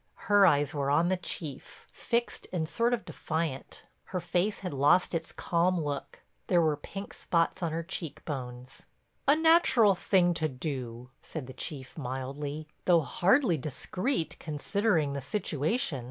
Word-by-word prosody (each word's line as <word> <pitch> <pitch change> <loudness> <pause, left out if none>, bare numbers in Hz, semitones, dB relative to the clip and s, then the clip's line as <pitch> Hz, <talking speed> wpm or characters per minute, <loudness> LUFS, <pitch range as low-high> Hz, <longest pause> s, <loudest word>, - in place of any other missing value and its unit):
Her 200 -1 +7
eyes 145 -1 +3
were 140 -2 -1
on 165 +5 +3
the 185 - +2
Chief, 155 -5 -6
fixed 235 0 -2
and 165 -4 -1
sort 235 +7 +1
of 225 - -11
defiant. 155 -4 -4 0.2
Her 185 - -3
face 180 +4 0
had 180 -5 -4
lost 145 +8 +4
its 165 -1 -2
calm 175 +1 +1
look; 145 -3 -4 0.3
there 180 - +4
were 155 -3 +3
pink 195 +7 -8
spots 170 +2 0
on 170 -2 -1
her 165 +1 -2
cheek 155 -4 -6
bones. 125 -3 -6 0.4
"A 285 - +7
natural 315 - +5
thing 180 -1 +3
to 160 -2 0
do," 125 -3 -5
said - - -6
the 130 - -9
Chief 135 +1 -6
mildly, 140 +3 -4 0.2
"though 170 -2 +5
hardly 190 - +3
discreet 180 - -2
considering 160 0 0
the 140 - -3
situation. 160 - 0
160 Hz, 155 wpm, -29 LUFS, 140-185 Hz, 0.4 s, Her